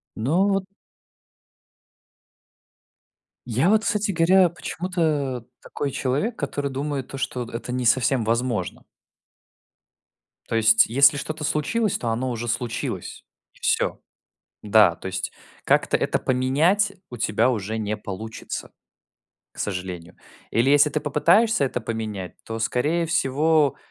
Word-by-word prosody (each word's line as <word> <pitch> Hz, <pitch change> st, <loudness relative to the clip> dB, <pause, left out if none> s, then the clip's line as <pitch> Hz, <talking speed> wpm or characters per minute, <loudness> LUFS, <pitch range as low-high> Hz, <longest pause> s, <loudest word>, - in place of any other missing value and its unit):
Ну 165 Hz, -, +1 dB
вот 195 Hz, -1 st, +1 dB, 2.8 s
Я 125 Hz, -, +2 dB
вот, 215 Hz, 0 st, +4 dB
кстати 210 Hz, -3 st, 0 dB
говоря, 180 Hz, +2 st, +5 dB
почему-то 155 Hz, -8 st, -2 dB, 0.2 s
такой 145 Hz, -, -4 dB
человек, 140 Hz, -, -1 dB
который 145 Hz, -1 st, -3 dB
думает 140 Hz, -1 st, -3 dB
то, 135 Hz, -, -7 dB
что 125 Hz, -2 st, -3 dB
д 115 Hz, -, -12 dB
это 120 Hz, +1 st, -5 dB
не 125 Hz, 0 st, -2 dB
совсем 125 Hz, 0 st, +3 dB
возможно. 115 Hz, -4 st, -1 dB, 1.6 s
То -, -, -3 dB
есть 115 Hz, 0 st, +5 dB
если 140 Hz, +4 st, +5 dB
что-то 155 Hz, +2 st, -5 dB
случилось, 190 Hz, +10 st, 0 dB
то 120 Hz, -, -3 dB
оно 120 Hz, +3 st, -1 dB
уже 120 Hz, 0 st, -4 dB
случилось. 115 Hz, 0 st, -4 dB, 0.3 s
И -, -, -23 dB
всё, -, -, 0 dB, 0.6 s
да, 105 Hz, -4 st, +5 dB
то -, -, -8 dB
есть 95 Hz, 0 st, -3 dB, 0.3 s
как-то -, -, +2 dB
это -, -, 0 dB
поменять 155 Hz, +11 st, +2 dB, 0.2 s
у 120 Hz, -, -7 dB
тебя 110 Hz, +2 st, +2 dB
уже 110 Hz, -2 st, -2 dB
не 110 Hz, -1 st, -2 dB
получится, 110 Hz, +3 st, -7 dB, 0.8 s
к -, -, -19 dB
сожалению. 90 Hz, -3 st, -5 dB, 0.3 s
Или 120 Hz, +4 st, +2 dB
если 145 Hz, +1 st, +5 dB
ты 150 Hz, -, -1 dB
попытаешься 170 Hz, +7 st, +3 dB
это 125 Hz, -2 st, -2 dB
поменять, 110 Hz, -5 st, -5 dB
то, 115 Hz, 0 st, -5 dB
скорее 150 Hz, +9 st, 0 dB
всего, 150 Hz, -1 st, +2 dB
130 Hz, 130 wpm, -23 LUFS, 115-155 Hz, 2.8 s, говоря